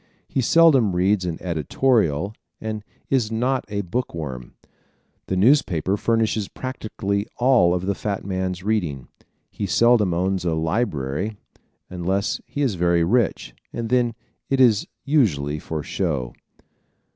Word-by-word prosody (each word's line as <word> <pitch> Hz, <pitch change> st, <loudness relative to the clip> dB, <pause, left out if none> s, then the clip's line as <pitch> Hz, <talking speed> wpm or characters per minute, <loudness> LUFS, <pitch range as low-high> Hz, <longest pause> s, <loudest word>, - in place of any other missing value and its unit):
He 135 Hz, -, -1 dB
seldom 135 Hz, -, +5 dB
reads 95 Hz, +1 st, +2 dB
an 85 Hz, -2 st, -3 dB
editorial 90 Hz, -, +1 dB, 0.3 s
and 110 Hz, -1 st, -4 dB, 0.3 s
is 120 Hz, -5 st, +2 dB
not 125 Hz, +4 st, 0 dB
a 100 Hz, -1 st, -2 dB
book 100 Hz, +3 st, -3 dB
worm. 65 Hz, -7 st, -6 dB, 0.7 s
The 95 Hz, -, -1 dB
newspaper 100 Hz, -, +3 dB
furnishes 110 Hz, -1 st, 0 dB
practically 105 Hz, -5 st, -3 dB
all 120 Hz, -9 st, +4 dB
of 90 Hz, +1 st, -3 dB
the 100 Hz, -, +1 dB
fat 100 Hz, -1 st, -4 dB
man's 95 Hz, -2 st, -3 dB
reading. 90 Hz, -, -1 dB, 0.4 s
He 100 Hz, -, -3 dB
seldom 115 Hz, -1 st, +4 dB
owns 95 Hz, +2 st, 0 dB
a 85 Hz, -2 st, 0 dB
library 80 Hz, -, -1 dB, 0.5 s
unless 95 Hz, +3 st, -1 dB
he 145 Hz, -, -2 dB
is 130 Hz, -6 st, +1 dB
very 85 Hz, -1 st, +2 dB
rich, 115 Hz, +5 st, +1 dB, 0.2 s
and 115 Hz, -1 st, -4 dB
then 120 Hz, -2 st, +2 dB, 0.3 s
it 135 Hz, -, +1 dB
is 115 Hz, -6 st, +4 dB, 0.2 s
usually 75 Hz, -, +1 dB
for 75 Hz, 0 st, -4 dB
"show." 70 Hz, -11 st, -2 dB
100 Hz, 135 wpm, -23 LUFS, 85-115 Hz, 0.7 s, seldom